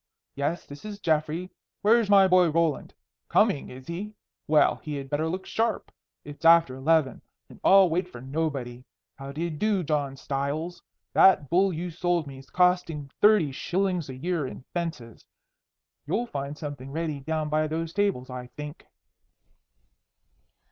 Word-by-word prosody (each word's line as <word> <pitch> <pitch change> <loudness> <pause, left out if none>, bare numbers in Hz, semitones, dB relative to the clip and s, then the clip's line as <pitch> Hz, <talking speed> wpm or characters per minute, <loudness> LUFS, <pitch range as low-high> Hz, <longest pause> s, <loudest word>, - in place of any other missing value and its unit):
Yes, 145 +5 -2
this 145 0 -11
is 210 -1 -7
Geoffrey. 160 +1 -1 0.3
Where's 225 0 +4
my 195 -1 +7
boy 180 -2 +5
Roland? 165 -2 0 0.4
Coming, 140 - +2
is 130 +1 -11
he? 200 +6 -6 0.3
Well, 155 0 +4
he 150 -1 -6
had 135 -1 -7
better 150 +2 0
look 185 +3 -4
sharp. 225 0 -1 0.3
It's 145 +1 -11
after 165 -4 +6
eleven, 150 +1 +1 0.3
and - - -15
I'll 195 -1 +7
wait 175 +2 -1
for 125 - -11
nobody. 130 -3 -3 0.4
How 135 0 -7
d'ye 165 +4 -3
do, 190 +4 0
John 145 -3 -1
Stiles? 145 +6 -3 0.3
That 170 -8 +5
bull 190 +3 +4
you 175 +1 -4
sold 175 0 0
me 135 -1 -10
's 135 - -21
costing 175 -6 +1
thirty 205 -9 +5
shillings 180 +2 -1
a 130 - -6
year 165 +1 -2
in 130 - -9
fences. 160 -10 -5 0.8
You'll 220 +10 0
find 140 -7 -5
something 140 -4 -7
ready 155 -1 -3
down 155 +2 -2
by 155 +1 +1
those 165 +1 -3
tables, 195 -11 0
I 125 -1 -6
think." 150 +1 -8
160 Hz, 155 wpm, -26 LUFS, 140-180 Hz, 0.8 s, my